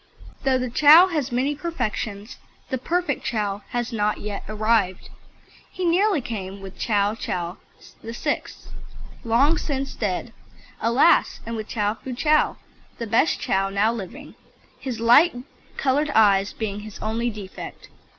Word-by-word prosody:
Though 265 -2 +3
the 255 -1 -3
Chow 310 +8 +8
has 300 -8 -2
many 260 +4 +1
perfections, 245 -8 -4 0.3
the 260 - -1
perfect 340 +1 -1
Chow 205 -4 -2
has 240 0 -3
not 210 -1 0
yet 205 -1 -5
arrived. 215 -3 0 0.6
He 370 - -3
nearly 370 0 +3
came 200 -5 -6
with 195 -1 -10
Ch. - - -4
Chow 200 -4 -1 0.4
VIII. 235 +6 -2 0.8
long 260 +8 +3
since 275 -2 -3
dead, 210 +2 -3 0.5
alas! 235 +4 +3
and 230 - -4
with 215 -1 -5
Ch. - - -8 0.3
Fu 255 -2 -5
Chow, 305 +3 +2 0.4
the 230 - -4
best 230 +8 +2
Chow 195 0 0
now 205 +3 +2
living, 200 -6 -8 0.5
his 250 -4 -5
light 245 +9 +6 0.4
coloured 290 +3 +1
eyes 200 -2 +4
being 210 -2 -4
his 210 -1 -9
only 225 +2 -2
defect. 205 -4 -9
230 Hz, 140 wpm, -23 LUFS, 205-275 Hz, 0.8 s, Chow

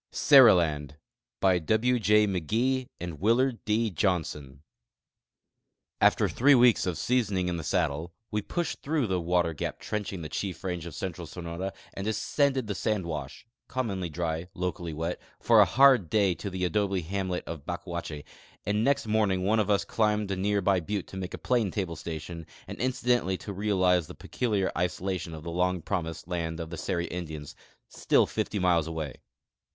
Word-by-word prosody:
4 - - -21
SERILAND 85 - +5 0.4
By 95 -2 +3
\V 110 +8 +2
J 105 +1 +4
McGee 115 - 0
arid 85 -4 -6
Willard 115 +4 +2
D. 110 +1 +1
Johnson 80 -7 -2 1.4
After - - +4
tliree 140 +2 +5
weeks 120 -5 +5
of 90 -4 -1
seasoning 100 -4 0
in 90 -1 -1
the 85 - -5
saddle, 80 -1 -1 0.2
we 105 - 0
pushed 170 - -3
through 150 -2 0
the 95 -4 -1
water 85 -1 +1
gap 75 - -4
trenching 100 -4 -4
the - - -4
chief 90 +4 -4
range 90 -3 -3
of 80 - -8
central 85 -1 -5
Sonora 85 +3 -5 0.2
and 95 - -5
descended 135 +4 +1
the 105 - -3
sand 105 -1 -1
wash 80 -3 -6 0.2
(commonly 100 -9 -2
dry, 80 +1 -3
locally 90 -1 -3
wet) 80 +3 -3 0.2
for - - +5
a - - +8
hard 130 - +5
day 100 -4 +3
to 100 - -6
the 90 -1 -2
adobe 100 0 0
hamlet 95 +1 -2
of 80 -4 -7
Bacuache, 85 -4 -5 0.4
and 105 +1 +1
next 140 0 +2
morning 105 -4 +1
one 110 +4 +2
of 105 -1 0
us 100 -1 +2
climbed 105 -2 0
a - - 0
near 100 +2 0
by 95 -1 +3
butte 100 +3 -3
to - - -10
make 95 -1 -4
a - - -9
planetable 100 -8 -1
station 85 +1 -7 0.2
and - - -8
inci 130 0 -2
dentally 120 -7 +2
to 100 - -7
realize 95 -4 +2
the 90 - -10
peculiar 105 -6 -1
isolation 90 -1 -2
of 80 - -9
the 85 - -5
long 90 +1 +1
promised 80 -2 -4
land 85 -2 -3
of 80 -1 -6
the 85 - -5
Seri 85 +3 -2
Indians, 80 -5 -6 0.3
still - - +2
fifty 105 - -3
miles 90 -4 +2
away. 80 -4 -5
95 Hz, 175 wpm, -28 LUFS, 85-105 Hz, 1.4 s, a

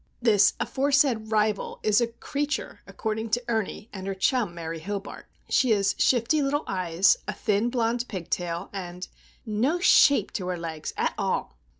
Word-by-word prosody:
This 215 -5 +4
aforesaid 270 -5 +1
rival 215 -1 0
is 215 +1 +3
a 235 - +2
"creature," 285 +5 -4
according 220 0 -3
to 240 +3 0
Ernie 220 -2 -2
and 190 -1 -6
her 195 - -2
chum, 205 -2 0
Mary 165 -1 -5
Hobart. 200 +4 -6 0.2
She 255 - +2
has 200 -1 +2
shifty 255 +5 +3
little 285 +2 0
eyes, 185 -1 +2
a 210 - -2
thin, 210 +3 0
blond 240 0 0
pigtail, 175 -2 -4
and 180 -2 -6 0.4
"no 235 +10 +1
shape 285 - +5
to 185 -3 -3
her 180 -1 -2
legs, 160 -2 -5
at - - 0
all." - - -1
215 Hz, 160 wpm, -26 LUFS, 190-245 Hz, 0.4 s, shape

